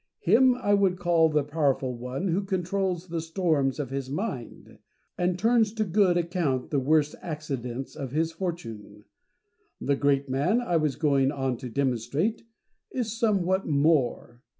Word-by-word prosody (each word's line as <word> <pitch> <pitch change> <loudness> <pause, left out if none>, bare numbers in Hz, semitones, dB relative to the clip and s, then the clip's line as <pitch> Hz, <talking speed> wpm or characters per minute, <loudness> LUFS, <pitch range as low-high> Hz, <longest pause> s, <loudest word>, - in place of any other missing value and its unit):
Him 250 +7 +5
I 205 -5 0
would 195 -3 +3
call 170 -2 +3
the 150 -1 +1
powerful 140 -4 0
one 125 +9 -4
who 185 +4 0
controls 185 -1 -2
the 165 -1 -2
storms 160 -5 0
of 135 -3 -4
his 135 -1 -4
mind, 145 - -5 0.4
and 180 0 0
turns 225 +1 +3
to 220 -1 0
good 185 -2 +3
account 170 -7 -1
the 145 - +2
worst 150 +2 +2
accidents 135 -6 -5
of 135 - -5
his 160 +3 0
fortune. 115 - -6 0.7
The 140 - +1
great 140 0 +1
man, 140 - +1
I 205 -9 0
was 155 -3 0
going 140 -3 +2
on 135 -3 -1
to 125 - -7
demonstrate, 140 - -1 0.5
is 230 -4 -3
somewhat 190 -4 +1
more. 140 -5 +1
160 Hz, 150 wpm, -27 LUFS, 135-185 Hz, 0.7 s, Him